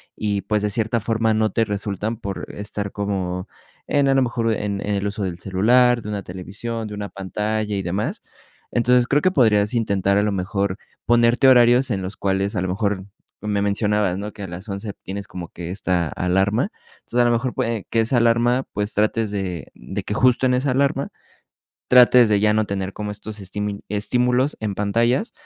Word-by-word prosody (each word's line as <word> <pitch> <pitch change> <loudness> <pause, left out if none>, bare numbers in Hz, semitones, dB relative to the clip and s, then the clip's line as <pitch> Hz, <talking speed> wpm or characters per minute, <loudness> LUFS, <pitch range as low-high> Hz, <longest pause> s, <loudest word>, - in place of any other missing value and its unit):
y 100 -2 -1
pues 105 0 -1
de 105 - 0
cierta 115 +2 0
forma 110 0 +1
no 110 0 +1
te 115 - +1
resultan 105 +1 -3
por 100 -3 -5
estar 100 0 -4
como 95 -3 -3 0.4
en 145 -1 +2
a 135 - +4
lo 135 - +4
mejor 115 -2 0
en 100 -2 -3
en 105 0 -1
el 100 0 -2
uso 100 0 -3
del 90 -3 -3
celular, 120 +7 +3
de 105 - -7
una 100 -2 -3
televisión, 105 +6 -6
de 105 - -8
una 100 -1 -5
pantalla 105 +2 -2
y 100 - -1
demás. 95 +4 -2 0.5
Entonces 120 0 +3
creo 145 +3 +2
que 185 - +3
podrías 110 - +3
intentar 100 -4 +1
a 100 - +3
lo 105 - +1
mejor 100 0 -1 0.3
ponerte 120 +3 +4
horarios 125 +1 +5
en 100 -3 -1
los 95 +2 -5
cuales, 100 +2 -1
a 90 - 0
lo 95 - -1
mejor, 100 0 -1 0.4
me 105 -1 -1
mencionabas, 100 -2 +1
¿no?, 105 +2 -5
que 100 - -9
a - - -5
las 90 +4 -8
11 100 +1 -5
tienes 100 +1 -6
como 90 -2 -7
que 85 -1 -7
esta 90 -3 0
alarma. 95 - 0 0.3
Entonces 120 - -3
a - - +4
lo 120 - +3
mejor 120 +2 0
puede 115 -3 -2
que 115 - +1
esa 115 +3 +1
alarma, 120 +2 +3
pues 105 +1 -2
trates 110 +1 +1
de 95 -7 -4
de - - -6
que - - -3
justo 130 +2 +3
en 125 - +3
esa 130 +2 0
alarma 140 +1 +1 0.8
trates 125 -1 +7
de 105 -1 +3
ya 105 +1 +3
no 110 0 +2
tener 95 -1 -3
como 105 -1 -4
estos 105 +1 -8
estim-estímulos 105 +7 -1
en 105 -2 -2
pantallas, 115 - +1
105 Hz, 200 wpm, -22 LUFS, 100-120 Hz, 0.8 s, trates